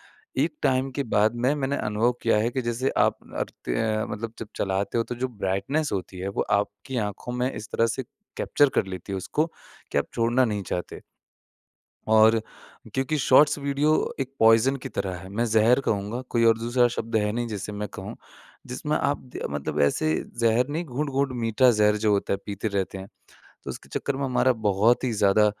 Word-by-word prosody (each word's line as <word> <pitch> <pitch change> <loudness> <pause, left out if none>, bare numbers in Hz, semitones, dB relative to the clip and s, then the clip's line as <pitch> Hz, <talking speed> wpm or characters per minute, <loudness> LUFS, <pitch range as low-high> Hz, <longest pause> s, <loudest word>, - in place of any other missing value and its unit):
है। 450 - -4
एक - - -3
टाइम 130 +1 +2
के 140 +2 -2
बाद 110 +3 +4
में 125 +4 +1
मैंने 140 -1 -1
अनुभव 110 +2 +1
किया 115 - +3
है 115 +2 +1
कि 130 +1 -2
जैसे 120 +3 -1
आप - - +3 0.2
करते - - -3
हैं 110 - 0
मतलब 110 +1 -5
जब 115 - -6
चलाते 100 +4 -1
हो, 115 - +1
तो 120 - -5
जो 130 +2 -2
ब्राइटनेस 115 +8 -1
होती 95 -1 -4
है 95 +2 -3
वो 100 - -1 0.2
आपकी 105 +6 -5
आँखों 105 +4 -7
में 125 +1 0
इस 110 0 -7
तरह 115 - +3
से 115 +3 -2 0.3
कैप्चर 145 -1 +3
कर - - +2
लेती 95 +1 -7
है - - -1
उसको 150 - -1 0.5
कि - - +2
आप - - 0
छोड़ना 120 +2 +3
नहीं 105 -3 -1
चाहते 90 - -3
हो। - - -11 1.1
और 110 0 +6 0.5
क्योंकि 135 +4 0
शॉर्ट्स 145 +3 +5
वीडियो 140 +2 +1 0.3
एक 135 -1 -3
पॉइज़न 115 +4 +5
की - - -5
तरह 95 -1 -3
है। 95 +2 -10
मैं 110 +5 -1
ज़हर 115 +3 +4
कहूँगा 105 +4 -1
कोई 115 -1 +2
और 115 -1 +5
दूसरा 120 +2 +2
शब्द 115 0 -3
है 105 -1 +2
नहीं 120 +2 -2
जिसे 105 -1 -5
मैं 105 0 -4
कहूँ। - - -7 0.5
जिसमें 150 +5 -1
आप 145 - 0
द 125 - -10
अ, - - -1
मतलब 70 -1 -3
ऐसे 155 - +2 0.3
ज़हर 115 +2 +3
नहीं 165 +4 -2
घूँट-घूँट 140 0 -1
मीठा 115 +3 +4
ज़हर 105 -1 +3
जो 105 0 +1
होता 100 -1 +1
है, - - 0
पीते 100 +1 -3
रहते 100 -2 -2
हैं। 95 - -8 0.6
तो - - -4
उसके - - -9
चक्कर 140 -1 -2
में 140 - -2
हमारा 130 0 +3
बहुत 110 +2 +2
ही 125 - 0
ज़्यादा 105 0 +4
115 Hz, 205 wpm, -25 LUFS, 105-130 Hz, 1.1 s, और